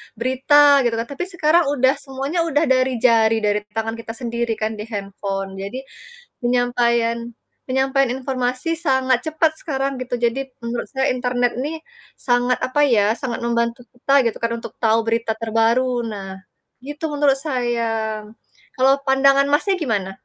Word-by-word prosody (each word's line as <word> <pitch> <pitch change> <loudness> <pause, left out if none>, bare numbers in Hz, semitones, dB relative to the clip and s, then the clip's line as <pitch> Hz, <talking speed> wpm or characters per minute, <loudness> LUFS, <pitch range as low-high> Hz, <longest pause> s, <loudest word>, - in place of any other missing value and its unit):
berita 280 +4 +4
gitu 230 - -1
kan, 225 - -1
tapi 280 +6 -4
sekarang 340 -2 +2
udah 260 -1 +4
semuanya 275 +4 -4
udah 300 -1 +1
dari 255 0 +2
jari, 225 -2 +4
dari 210 0 +2 0.2
tangan 225 0 -2
kita 225 0 -7
sendiri 235 -1 -2
kan 215 0 -2
di 210 - -6
handphone, 195 -2 -5
jadi, 200 +6 -5 0.6
penyampaian 240 -1 +1 0.5
penyampaian 265 0 +1
informasi 255 +4 -1
sangat 260 -5 +1
cepat 315 0 +2
sekarang 275 -7 -1
gitu, 250 -1 -4
jadi 260 +3 -1
menurut 235 +1 -4
saya 265 +1 +1
internet 245 -1 -1
nih, 320 +3 -4 0.3
sangat, 245 0 +1
apa 295 +3 +2
ya, 220 -5 +3
sangat 255 -5 -3
membantu 235 0 -1
kita 245 +3 -2
gitu 225 - -3
kan, 230 - 0
untuk - - -10
tahu 225 0 +4
berita 230 0 0
terbaru 230 +3 +1
nah, 195 -2 -7 0.5
gitu 295 +3 -5
menurut 285 -2 +2
saya. 245 -5 -1 1.0
Kalau 270 +2 +4
pandangan 275 +1 +4
Masnya 380 +7 +2
gimana? 200 -8 -2
250 Hz, 150 wpm, -20 LUFS, 230-270 Hz, 1.0 s, berita